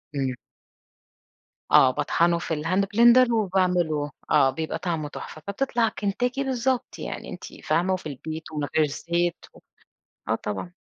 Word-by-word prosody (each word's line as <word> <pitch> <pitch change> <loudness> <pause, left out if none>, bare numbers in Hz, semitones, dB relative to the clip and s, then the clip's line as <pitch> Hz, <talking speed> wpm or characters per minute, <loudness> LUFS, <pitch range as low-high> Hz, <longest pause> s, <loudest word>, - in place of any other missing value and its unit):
امم. 135 -2 -1 1.4
آه، 130 - +7
باطحنه 170 +5 +1
في 170 - -3
الhand 185 +4 +2
blender 240 +2 +7
وباعمله، 180 -8 +1 0.2
آه، 140 -3 +5
بيبقى 160 +3 -3
طعمه 165 -4 -2
تحفة، 155 - -9
فبتطلع 235 +2 0
كنتاكي 245 +7 -1
بالضبط 260 -1 -1
يعني، - - -6
أنتِ - - -8 0.2
فاهمة، 170 +4 +1
وفي 185 -4 -4
البيت، 155 +3 -7
ومن 150 -2 -2
غير 155 -1 +4
زيت، 170 +4 -2
و - - -16 0.7
آه - - +2
طبعًا. 105 - -5
175 Hz, 140 wpm, -25 LUFS, 155-215 Hz, 1.4 s, آه